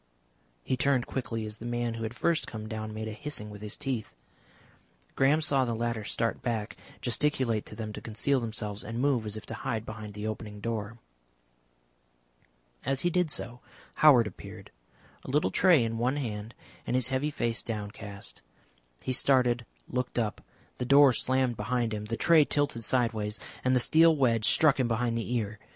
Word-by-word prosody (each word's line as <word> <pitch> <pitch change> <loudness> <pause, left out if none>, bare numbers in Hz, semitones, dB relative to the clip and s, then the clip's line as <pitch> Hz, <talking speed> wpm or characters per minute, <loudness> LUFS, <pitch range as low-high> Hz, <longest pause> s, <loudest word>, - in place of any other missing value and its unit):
He 130 - 0
turned 130 -1 +2
quickly 115 -4 -3
as 105 0 -8
the 115 - -8
man 120 -1 -1
who 115 - -6
had 110 +1 -4
first 170 +6 +1
come 110 -1 -6
down 110 -1 -5
made 110 +1 -5
a - - -4
hissing 110 -3 -4
with 105 0 -10
his 105 -1 -5
teeth. 130 - -3 1.0
Graham 145 +4 +4
saw 140 -4 +2
the 120 -2 -1
latter 115 -1 -2
start 115 +2 -2
back, 115 -3 -2 0.3
gesticulate 120 -3 0
to - - -8
them 110 -1 -5
to - - -7
conceal 125 +5 0
themselves, 110 -3 -4
and 115 +2 -5
move 130 -5 +1
as 105 +1 -4
if 105 - -9
to - - -7
hide 115 -5 -3
behind 110 -2 -8
the 105 0 -5
opening 110 -1 -5
door. 115 0 -3 1.9
As 135 +1 0
he 175 - +1
did 180 -2 +2
so 120 -4 -5 0.4
Howard 135 -7 +8
appeared, 105 - -9 0.5
a - - -9
little 150 +3 +2
tray 175 -9 +5
in 115 0 -2
one 125 +4 +1
hand 110 -4 -4 0.3
and - - 0
his 130 0 +2
heavy 130 +3 0
face 120 -5 -1
downcast. 105 -2 -6 0.6
He 130 - -1
started, 125 -3 +2 0.2
looked 125 0 -3
up, 110 -3 -1 0.4
the - - -1
door 140 +1 +7
slammed 130 -1 +1
behind 115 +1 -1
him, 105 0 -4
the 115 +1 -3
tray 165 -3 +6
tilted 145 -5 -1
side 120 0 +2
ways, 105 0 -3 0.2
and 130 0 +3
the - - +4
steel 160 +6 +5
wedge 115 -6 +2
struck 145 +3 +5
him 130 - +2
behind 115 0 0
the 115 +1 -3
ear. 110 -2 -2
120 Hz, 185 wpm, -29 LUFS, 110-130 Hz, 1.9 s, Howard